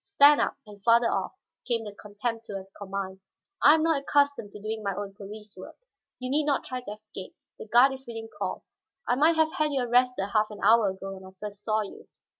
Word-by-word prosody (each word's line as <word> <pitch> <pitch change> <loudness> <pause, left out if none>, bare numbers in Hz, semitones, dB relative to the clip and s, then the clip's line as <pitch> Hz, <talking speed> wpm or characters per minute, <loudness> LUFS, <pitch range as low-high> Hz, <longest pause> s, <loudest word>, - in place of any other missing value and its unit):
"Stand 295 -7 +6
up, - - 0
and 205 -2 -14
farther 235 +1 +5
off," - - -2 0.3
came 235 -3 0
the 210 -2 -7
contemptuous 210 -1 -5
command. 190 -1 -5 0.4
"I 295 - +8
am 315 - +1
not 320 -4 +2
accustomed 285 -7 +1
to 210 - -9
doing 215 +1 -4
my 200 -2 -2
own 200 0 -5
police 210 +1 -10
work. 185 - -10 0.4
You 255 0 -5
need 295 +1 +2
not 285 -2 +1
try 255 -1 -5
to 225 - -8
escape; 210 -3 -10 0.2
the - - -8
guard 245 +5 +6
is 265 -1 -10
within 225 -1 -6
call. - - -5 0.4
I - - +3
might 310 +6 +4
have 315 0 +2
had 305 -1 +1
you 275 -2 0
arrested 245 -3 +2
half 215 -1 +3
an 210 - -9
hour 220 0 +5
ago 195 +1 -6
when 190 0 -10
I 190 0 -14
first 210 -1 -7
saw 215 -1 +1
you." 205 - -9
220 Hz, 220 wpm, -27 LUFS, 205-260 Hz, 0.4 s, I